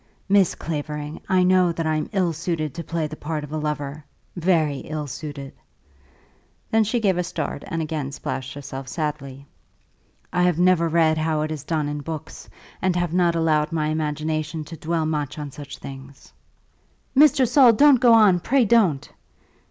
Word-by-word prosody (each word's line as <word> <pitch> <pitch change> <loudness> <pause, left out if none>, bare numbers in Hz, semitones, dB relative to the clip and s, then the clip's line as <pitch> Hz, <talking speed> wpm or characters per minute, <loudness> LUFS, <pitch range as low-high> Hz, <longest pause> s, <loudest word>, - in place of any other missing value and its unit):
"Miss 195 -3 +3
Clavering, 150 -1 -5
I 185 -1 +4
know 180 -1 +4
that 165 0 -3
I 155 0 +1
am 155 - -2
ill 185 -5 +1
suited 160 -2 -3
to 170 - -6
play 165 -2 -2
the 155 0 -6
part 155 0 -4
of 150 - -9
a 155 - -2
lover; 150 -1 -4 0.3
very 165 -5 +1
ill 155 -1 -5
suited." 140 0 -7 1.2
Then 220 0 +4
she 220 +3 0
gave 190 -5 +1
a - - +1
start 175 - -4
and 165 -1 -2
again 150 -3 -4
splashed 135 -1 -5
herself 135 -2 -7
sadly. 140 -2 -4 0.9
"I 180 - +1
have 180 -2 +2
never 175 -2 +3
read 160 -1 +3
how 155 -1 0
it 155 - -3
is 155 -3 -5
done 155 -3 -1
in 145 0 -3
books, 155 +1 -8 0.3
and 185 -1 +1
have 175 -2 -1
not 175 -2 +2
allowed 155 -2 +1
my 155 -2 -1
imagination 155 0 -2
to 165 - -9
dwell 160 +1 -2
much 150 -3 -2
on 145 -2 -6
such 140 +1 -9
things." 135 0 -11 0.8
"Mr. 275 -2 +5
Saul, 255 -1 +6
don't 280 +3 +6
go 240 -3 +7
on; 205 -5 +5
pray 250 +7 +2
don't." 195 -11 +3
160 Hz, 175 wpm, -23 LUFS, 150-180 Hz, 1.2 s, go